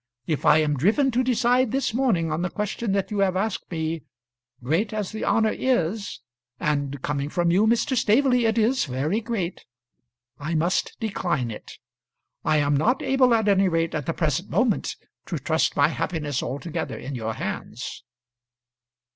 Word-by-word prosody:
If 155 -3 -1
I - - +7
am 150 -2 +1
driven 225 - +3
to 250 +2 +1
decide 250 0 +2
this 270 -4 0
morning 215 -11 +1
on 155 +2 -1
the 180 - -1
question 210 +3 -3
that 195 +2 -1
you 205 - -1
have 190 -2 +2
asked 205 +2 -2
me, 160 -1 -2 0.6
great 170 - 0
as 210 -3 -3
the 215 - -5
honour 220 -1 +2
is 205 - -1 0.4
and 145 -3 -1
coming 145 -1 -2
from 175 +1 +1
you, 200 +5 +4
Mr. 235 +3 +2
Staveley, 245 +2 +3
it 220 - 0
is 235 +4 +2
very 145 - -1
great 210 -6 -3 0.8
I 155 +4 -3
must 170 +4 0
decline 175 - -1
it. 105 - -9 0.7
I 155 - +2
am 145 -1 +2
not 240 - +2
able, 265 -2 +3
at 220 -2 +1
any 195 -1 +4
rate 165 -1 0
at 150 -4 -3
the 165 - 0
present 160 +2 -1
moment, 240 -4 +1 0.3
to - - -2
trust - - 0
my - - +5
happiness 150 -6 -2
altogether 160 +4 -4
in 135 +3 -6
your 110 -3 -3
hands." - - -5
185 Hz, 170 wpm, -24 LUFS, 155-225 Hz, 0.8 s, I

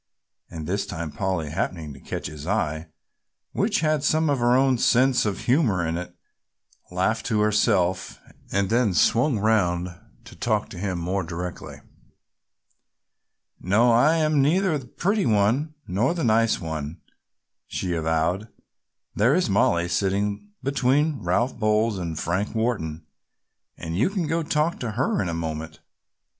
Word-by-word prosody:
And 80 -2 -7
this 100 +4 -2
time 85 -6 -5
Polly 90 -6 -2
happening 80 -3 -3
to 65 - -13
catch - - -6
his 75 +1 -7
eye, 80 -5 -1 0.6
which 205 -2 0
had 155 -2 +1
some 155 0 +2
of 140 - 0
her 120 +1 +3
own 130 -2 +3
sense 125 -1 +3
of 100 -2 -3
humor 120 - +2
in 80 +1 -1
it, 90 +1 -6 0.7
laughed 95 +5 -1
to 110 -3 +1
herself 100 -4 +1 0.3
and 100 +1 0
then 115 -5 +2
swung 120 - +3
round 90 -5 +1 0.3
to - - -13
talk - - -1
to - - -9
him 95 -2 -2
more 90 +3 -1
directly. 90 +1 -6 1.8
"No, 110 +6 +3
I 140 +8 +4
am 155 -3 +2
neither 170 +4 +2
the 130 - -12
pretty 200 - 0
one 115 +9 +1
nor 110 - 0
the 170 - -2
nice 115 -1 +3
one," 80 -2 -5 0.7
she 90 - -3
avowed. 80 +5 0 0.7
"There 120 +8 +3
is 180 - +1
Mollie 85 -3 +2
sitting 100 - -1
between 140 +2 +1
Ralph 115 +9 0
Bowles 110 -1 +1
and 85 -3 -4
Frank 95 +7 -2
Wharton 85 -9 -2 0.7
and 80 0 -5
you 115 - +2
can 195 -4 -2
go 165 +2 0
talk 155 +1 0
to 115 -4 -4
her 120 -2 0
in 90 - -2
a 85 - -2
moment. 80 -1 -5
105 Hz, 150 wpm, -24 LUFS, 85-130 Hz, 1.8 s, I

